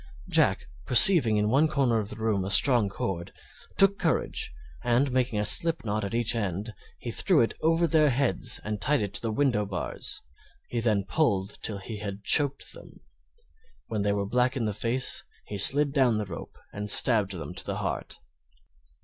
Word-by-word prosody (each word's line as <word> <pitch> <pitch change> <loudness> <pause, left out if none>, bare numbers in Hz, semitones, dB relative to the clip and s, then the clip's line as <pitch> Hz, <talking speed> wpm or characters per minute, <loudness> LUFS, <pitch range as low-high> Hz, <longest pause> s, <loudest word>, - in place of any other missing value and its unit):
Jack, - - +1 0.2
perceiving 150 - +7
in 105 +1 0
one 145 +5 +3
corner 135 -7 0
of 105 -1 -5
the - - -6
room 110 -3 -2
a 95 - -5
strong 110 +1 +5
cord, 90 -3 -5 0.5
took 195 0 +3
courage, - - -2 0.3
and 125 +3 +1
making 125 -3 -1
a 105 - -1
slip 165 +5 0
knot 105 0 -2
at 100 +3 -4
each 120 0 +2
end, 105 0 -4 0.2
he 120 - -7
threw 155 0 +2
them - - -8
over 165 +2 +1
their 155 -2 +2
heads, 130 -7 0
and 105 -1 -5
tied 140 +1 0
it 100 -1 -6
to - - -3
the 115 - -3
window 120 -3 0
bars; 95 -3 -5 0.5
he 120 - -3
then 110 -4 0
pulled 100 -11 -2
till 105 - -3
he 105 +3 -8
had 100 -1 -7
choked 140 +2 +3
them. - - -15 0.9
When 110 -2 -3
they 100 0 0
were 100 0 -2
black 125 +5 0
in 120 - -2
the 105 - -2
face 120 +5 -2 0.2
he 100 - -6
slid 140 +7 +6
down 130 -6 +2
the 105 - -3
rope 90 -4 -10 0.2
and 105 +1 -6
stabbed 105 -4 +4
them 90 0 -8
to 90 - -4
the - - -5
heart. - - -5
115 Hz, 190 wpm, -26 LUFS, 100-135 Hz, 0.9 s, perceiving